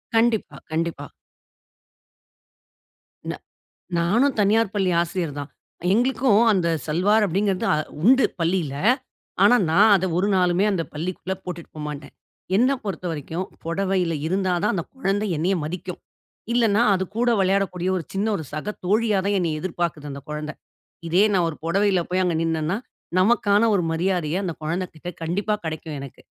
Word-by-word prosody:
கண்டிப்பா, 225 -1 +2
கண்டிப்பா. 160 -3 -2 2.2
ந - - -2 0.7
நானும் 230 +11 +2
தனியார் 210 +1 +3
பள்ளி 190 -3 +1
ஆசிரியர் 170 -4 -2
தான். 145 0 -6 0.4
எங்களுக்கும் 240 -2 +3
அந்த 175 -4 +1 0.2
'சல்வார்' 205 +7 +3
அப்படீங்கிறது 195 +1 0
அ - - +1 0.3
உண்டு 260 +6 +6 0.2
பள்ளியில. 165 -4 0 0.7
ஆனா, 245 +5 +7
நான் 205 +6 +6
அத 190 - -1
ஒரு 200 +3 +1
நாளுமே 180 +1 +3
அந்த 180 -4 0
பள்ளிக்குள்ள 180 +4 -3
போட்டுட்டு 175 -2 -7
போ - - -6
மாட்டேன். 140 -2 -8 0.4
என்ன 250 +5 +4
பொறுத்த 185 -2 -4
வரைக்கும் 160 +4 -4 0.2
புடவையில 180 -1 0
இருந்தா 185 +1 0
தான், - - +2
அந்த 170 - -2
குழந்தை 205 -3 0
என்னைய 180 +5 +1
மதிக்கும். 180 +2 -6 0.5
இல்லன்னா, 230 -2 +3
அது 190 0 0
கூட 240 +1 +2
விளையாடக்கூடிய 185 -1 +1
ஒரு 165 - -3
சின்ன 200 +3 0
ஒரு 160 - -6
சக 155 +8 -3
தோழியா 210 +1 +2
தான் 200 0 +2
என்னைய 160 -4 -1
எதிர்பாக்குது 170 -5 -3
அந்த 140 - -7
கொழந்தை. 150 0 -5 0.5
இதே 180 +4 +4
நான் 180 -3 +2
ஒரு 155 - -5
பொடவையில 195 +2 +2
போய் 185 +1 +2
அங்க 175 -2 +1
நின்னன்னா, 165 +2 0 0.4
நமக்கான 205 +1 +3
ஒரு 185 - +2
மரியாதைய 175 -1 0
அந்த 175 - -2
குழந்தைகிட்ட 175 +1 -4
கண்டிப்பா 195 +6 0
கெடைக்கும் 160 -1 -5
எனக்கு. 135 -2 -10
185 Hz, 145 wpm, -23 LUFS, 165-205 Hz, 2.2 s, ஆனா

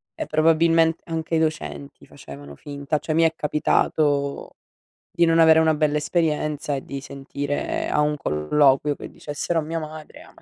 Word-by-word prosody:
e - - -4
probabilmente 165 +1 +3
anche 165 0 -3
i - - +2
docenti 75 - -4
facevano 70 0 -12
finta; 145 - -4
cioè 155 - -3
mi 165 - +4
è 165 0 +3
capitato 145 -1 0 0.6
di 170 - +2
non 165 0 +3
avere 160 -1 +6
una 160 -1 +3
bella 150 -1 +1
esperienza 150 -2 -1
e 135 - -5
di 140 0 -7
sentire 140 +1 -4
a - - 0
un 150 0 0
colloquio 135 - +2
che - - -9
dicessero 155 +3 -3
a - - -1
mia 160 +2 -4
madre: 155 -1 -9
"Ah, - - -18
ma - - -20
150 Hz, 175 wpm, -23 LUFS, 140-160 Hz, 0.6 s, avere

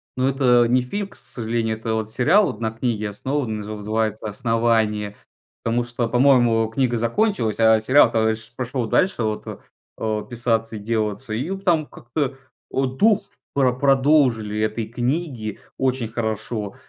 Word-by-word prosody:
Ну 130 +1 +1
это 125 -3 +4
не 125 +1 +3
фильм, 200 +11 -4
к - - -17
с - - -13
сожалению. 115 -2 -2
Это 110 0 -3
вот 110 -1 -2
сериал 175 - +3
на 110 -1 -1
книге 110 -2 -2
основан, 125 +1 -2
назы 105 0 -6
называется 110 +1 -2
"Основание", 110 -1 0 0.5
потому 115 +1 +1
что, 120 0 -2
по-моему, 120 -3 +4
книга 120 +1 0
закончилась, 115 - 0
а 110 -1 +5
сериал-то 110 -2 +4
пш 115 +1 -11
пошел 125 -2 -3
дальше, 180 - +1
вот, 110 -1 -2
э, - - -6 0.4
э, 110 -1 -2
писаться 115 -2 -1
и - - -5
делаться, 110 -1 -2
и 145 - -2
там 170 -5 +2
как-то, 135 +2 -4 0.4
о, 135 - +1
дух 205 - +2 0.3
про 130 -3 +3
продолжили 130 -5 +2
этой 110 +1 -1
книги 120 - -3 0.2
очень 130 -3 0
хорошо. 110 -2 -3
115 Hz, 155 wpm, -22 LUFS, 110-130 Hz, 0.5 s, а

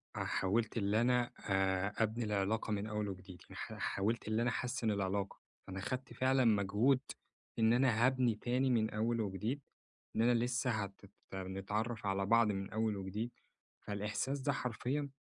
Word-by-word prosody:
أ - - -1
حاولت 110 +4 0
اللي 105 +1 +2
أنا 125 0 +2 0.2
آآ، 95 +1 +2
أبني 110 +2 -1
العلاقة 105 +2 0
من 105 0 -1
أول 105 -1 -2
وجديد، 90 -2 -9
يعني - - -14
ح - - -5
حاولت 105 +4 -1
إن 110 +1 +1
أنا 120 +1 +2
أحسن 120 -2 -1
العلاقة. 100 0 -1 0.3
فأنا 95 +1 -5
أخدت 130 +7 -4
فعلًا 130 0 +3
مجهود 110 +5 +4 0.6
إن 110 0 +5
أنا 120 -2 +4
هابني 130 -3 +3
تاني 125 +4 +1
من 110 -3 +3
أول 115 +2 0
وجديد، 105 +7 -2 0.5
إن - - +2
أنا 120 +2 +5
لسه 125 +1 0
هتت 100 -2 -4 0.2
نتعرف 105 +4 -3
على 100 0 +1
بعض 115 +2 +5
من 95 0 -3
أول 110 -1 0
وجديد. 100 +5 -3 0.5
فالإحساس 105 +7 -2
ده 140 +1 +1
حرفيًا 130 +3 -2
110 Hz, 160 wpm, -35 LUFS, 100-120 Hz, 0.6 s, إن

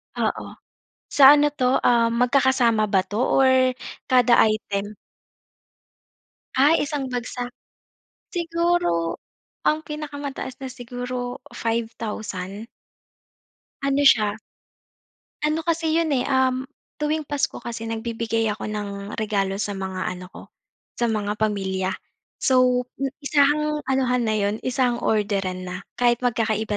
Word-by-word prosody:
Oo, - - -1 0.6
sa 285 0 +9
ano 295 0 +3
'to, 260 -2 +1
ah, 235 -1 +4
magkakasama 245 -2 +3
ba 190 -2 +2
'to 205 +4 -4
or 260 0 +4 0.3
kada 250 -1 +5
item? 210 -1 -2 1.6
Ah, 290 +5 +5
isang 280 -2 -2
bagsak. 245 0 -4 0.8
Siguro 335 - 0 0.4
ang 310 +1 +1
pinakamataas 285 -3 -6
na 270 - -6
siguro, 245 0 -5 0.2
5000. 220 -3 -4 1.2
Ano 275 +1 +2
siya, 215 -7 +5 1.1
ano 305 +2 +1
kasi 325 -1 +1
'yon, 325 -3 +1
eh, 255 -2 +1
um, 260 0 +1 0.3
tuwing 305 +1 0
Pasko 290 -1 -1
kasi 230 -1 -5
nagbibigay 225 0 -2
ako 215 - -6
ng 200 -1 -5
regalo 200 -3 -1
sa 205 0 -2
mga 190 -1 -4
ano 180 0 -5
ko, - - -12 0.6
sa 240 - +3
mga 210 -2 -1
pamilya. 190 -3 0 0.5
So, 255 -1 +3 0.2
eh, 275 - +1 0.2
isahang 300 +1 +2
anuhan 255 -2 +1
na 215 - +1
'yon 205 0 0
isahang 250 -2 0
orderan 195 -4 0
na, 180 0 -5 0.2
kahit 240 -1 +2
magkakaiba 220 -3 0
245 Hz, 115 wpm, -23 LUFS, 210-270 Hz, 1.6 s, sa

